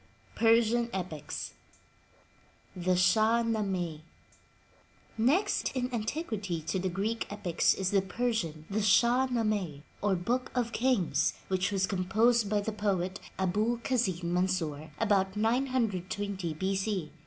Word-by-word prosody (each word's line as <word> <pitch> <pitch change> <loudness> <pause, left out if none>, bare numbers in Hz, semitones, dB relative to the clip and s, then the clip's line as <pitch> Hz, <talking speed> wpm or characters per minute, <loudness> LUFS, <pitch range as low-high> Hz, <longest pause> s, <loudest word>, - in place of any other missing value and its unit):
tPERSIAN 230 +1 +3
EPICS 160 -5 -5 1.2
THE 180 0 +1
SHAH 215 +6 +4
NAMEH 190 -8 -1 1.2
Next 270 - +2
in 250 0 -2
antiquity 220 - -2
to 160 +4 -2
the 185 +1 -1
Greek 205 +6 -2
epics 200 -5 +1
is 190 -1 -1
the 200 -1 +4
Persian, 190 -6 -2
the 210 +2 -1
Shah 235 +5 +4
Namehy 210 - -1 0.2
or 205 -2 +2
Book 240 +9 -1
of 240 -2 0
Kings, 245 -8 +1
which 190 +1 0
was 195 -1 +1
composed 210 +4 +2
by 210 0 +1
the 220 - -3
poet 195 -3 -1 0.2
Abul 210 +6 +1
Kasin 225 -8 -1
Mansur 165 -5 -1
about 200 -2 +1
920 205 -7 -1
B. 190 +4 -1
C. 190 -5 -2
205 Hz, 120 wpm, -30 LUFS, 185-230 Hz, 1.2 s, SHAH